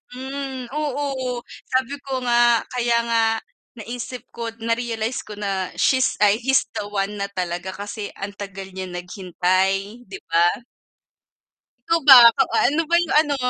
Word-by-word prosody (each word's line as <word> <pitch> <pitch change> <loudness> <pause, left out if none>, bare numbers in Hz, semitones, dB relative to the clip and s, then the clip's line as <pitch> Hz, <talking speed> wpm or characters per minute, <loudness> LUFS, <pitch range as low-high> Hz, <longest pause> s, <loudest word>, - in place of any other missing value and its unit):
Mm, 265 -1 -6
oo, 275 -4 -3 0.2
sabi 260 +2 -1
ko 260 -1 -3
nga, 240 -1 +4
kaya 240 -1 +1
nga 230 -1 +1 0.6
naisip 245 +1 -6
ko, 235 -1 -6 0.2
na-realize 230 0 -2
ko 210 - -8
na 195 -3 -3
she's 260 -1 +2
ay, 210 +1 +5
he's 265 +2 +2 0.2
the 205 - -4
one 205 0 -3
na 200 - -1
talaga, 180 +1 -4
kasi 205 +1 -6
ang 195 +1 -6
tagal 195 -1 -7
niya 190 0 -6
naghintay 185 +4 -1
'di 390 - -8
ba? 170 +1 +4 1.4
Ikaw 335 0 +2
ba, 265 - +12 0.2
kaw 270 - +2
ah, - - +3
ano 310 - +1
ba 340 - +4
yung 345 -1 +1
ano, 295 -2 -1
235 Hz, 150 wpm, -22 LUFS, 195-260 Hz, 1.4 s, ba